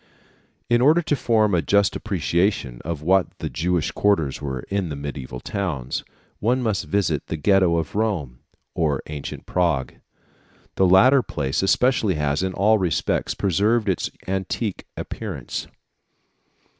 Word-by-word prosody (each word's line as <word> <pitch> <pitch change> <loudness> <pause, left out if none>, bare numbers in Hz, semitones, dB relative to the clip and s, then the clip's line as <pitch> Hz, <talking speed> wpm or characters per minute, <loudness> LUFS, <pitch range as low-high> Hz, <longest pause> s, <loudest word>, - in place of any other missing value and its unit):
In 120 0 +3
order 155 +6 +5
to 150 - +1
form 110 -5 +2
a 85 - +3
just 100 +3 +2
appreciation 85 - -1
of 80 -2 -4
what 95 +2 +2
the - - -5
Jewish 85 0 0
quarters 80 -11 +1
were 65 -3 -3
like - - -18
in 100 -3 -1
the 75 - -4
mediæval 70 -3 -6
towns, 75 - -3 0.4
one 125 +4 +1
must 110 -4 0
visit 90 -8 0
the 80 - -3
Ghetto 95 0 +3
of 80 -3 -3
Rome 95 - -1 0.3
or 75 -5 0
ancient 75 -2 -7
Prague. 85 -8 0 0.8
The 95 - +3
latter 125 +10 +6
place 70 - -2
especially 110 -1 +2
has, 75 0 0
in 95 0 -1
all 105 +3 +3
respects, 90 -3 0
preserved 105 +4 +1
its 95 -3 0 0.2
antique 95 +2 -3
appearance. 90 - -5
95 Hz, 145 wpm, -23 LUFS, 75-105 Hz, 0.8 s, latter